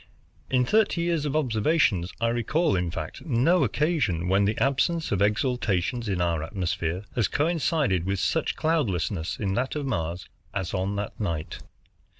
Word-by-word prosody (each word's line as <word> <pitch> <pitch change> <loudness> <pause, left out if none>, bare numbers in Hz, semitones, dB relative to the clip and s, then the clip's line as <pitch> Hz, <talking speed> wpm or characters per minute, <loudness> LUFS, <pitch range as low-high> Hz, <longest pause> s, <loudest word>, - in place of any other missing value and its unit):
In 125 -1 +2
thirty 210 - +2
years 170 -3 0
of 145 0 -2
observations, 115 - +2
I 115 0 +2
recall, 120 - +1
in 90 -1 0
fact, 80 -1 -6
no 155 +4 +3
occasion 130 - 0
when 95 +2 +3
the 105 +2 0
absence 160 +5 +1
of 100 -2 +1
exhalations 110 0 0
in 95 -3 -1
our 85 -2 +1
atmosphere 90 +1 -2
has 115 -4 +1
coincided 150 - +1
with 100 0 0
such 130 - 0
cloudlessness 100 - -1
in 100 -3 -1
that 125 +7 -1
of 150 -2 -2
Mars 85 -8 -3 0.3
as 95 -4 -2
on 95 +1 -1
that 100 0 -4
night. 85 -7 -3
110 Hz, 155 wpm, -26 LUFS, 90-150 Hz, 0.3 s, no